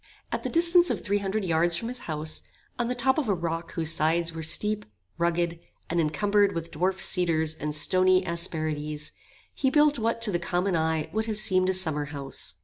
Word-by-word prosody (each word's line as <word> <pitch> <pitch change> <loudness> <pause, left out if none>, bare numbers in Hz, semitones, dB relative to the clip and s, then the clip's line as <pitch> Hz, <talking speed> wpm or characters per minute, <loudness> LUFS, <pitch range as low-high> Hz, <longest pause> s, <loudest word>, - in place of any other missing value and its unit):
At - - -2
the - - -3
distance 345 +1 +5
of - - -2
three 205 0 0
hundred 200 +1 -2
yards 170 0 +2
from 230 - -3
his 250 +1 -4
house, 155 0 -2 0.4
on 240 - 0
the 250 - -1
top 265 +4 +1
of 270 -8 -2
a 200 - +2
rock 165 -1 -4
whose 165 -2 +3
sides 165 +1 +1
were 165 - -6
steep, 210 +7 +1 0.4
rugged, 170 0 0 0.3
and 170 0 +2
encumbered 200 +6 +1
with 165 0 -4
dwarf 185 +4 -1
cedars 165 -4 +1
and 150 -1 -4
stony 185 +3 +3
asperities, 155 -3 -4 0.4
he 265 - 0
built 295 0 +3
what 230 +1 0
to 215 -4 +1
a - - +1
common 180 +2 -1
eye 160 -1 0
would 220 +1 -1
have 215 -2 -2
seemed 185 -3 +3
a - - +2
summer 160 -5 0
house. 140 -2 -4
175 Hz, 200 wpm, -26 LUFS, 160-210 Hz, 0.4 s, distance